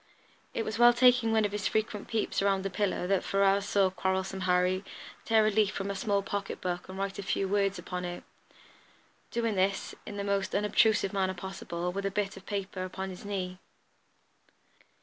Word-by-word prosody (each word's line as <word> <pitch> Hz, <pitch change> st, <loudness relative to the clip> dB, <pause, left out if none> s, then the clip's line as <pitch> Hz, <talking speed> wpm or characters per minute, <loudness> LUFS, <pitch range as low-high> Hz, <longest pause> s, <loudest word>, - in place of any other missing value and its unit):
It 225 Hz, -, -1 dB
was 215 Hz, +1 st, -3 dB
while 240 Hz, 0 st, +8 dB
taking 245 Hz, -2 st, +5 dB
one 220 Hz, -1 st, +3 dB
of 205 Hz, -, -1 dB
his 210 Hz, -1 st, -1 dB
frequent 215 Hz, -1 st, -1 dB
peeps 220 Hz, -3 st, -1 dB
around 195 Hz, -1 st, +2 dB
this 195 Hz, -1 st, -3 dB
pillar 200 Hz, -3 st, 0 dB
that 190 Hz, 0 st, +1 dB
Ferrars 195 Hz, 0 st, +2 dB
saw 195 Hz, -2 st, +3 dB
"Quarrelsome 190 Hz, +1 st, -1 dB
Harry" 180 Hz, +1 st, +2 dB, 0.4 s
tear 220 Hz, -1 st, +4 dB
a 215 Hz, -, +3 dB
leaf 210 Hz, -1 st, +3 dB
from 200 Hz, -1 st, -3 dB
a -, -, -4 dB
small 200 Hz, 0 st, 0 dB
pocket 200 Hz, 0 st, -4 dB
book 180 Hz, 0 st, -3 dB
and 190 Hz, -, -7 dB
write 195 Hz, 0 st, -3 dB
a -, -, -1 dB
few 195 Hz, 0 st, -1 dB
words 200 Hz, 0 st, +1 dB
upon 180 Hz, 0 st, -5 dB
it, 175 Hz, 0 st, -5 dB, 1.1 s
doing 230 Hz, -2 st, 0 dB
this 195 Hz, 0 st, 0 dB
in 205 Hz, -, -6 dB
the 200 Hz, -, -2 dB
most 200 Hz, -1 st, -1 dB
unobtrusive 210 Hz, 0 st, +3 dB
manner 190 Hz, -1 st, 0 dB
possible, 180 Hz, -1 st, -4 dB
with 200 Hz, +2 st, -4 dB
the -, -, +2 dB
bit 200 Hz, 0 st, -2 dB
of 195 Hz, 0 st, -13 dB
paper 195 Hz, -2 st, -3 dB
upon 190 Hz, +1 st, -5 dB
his 180 Hz, -, -10 dB
knee. 185 Hz, -3 st, -4 dB
195 Hz, 190 wpm, -30 LUFS, 190-205 Hz, 1.1 s, while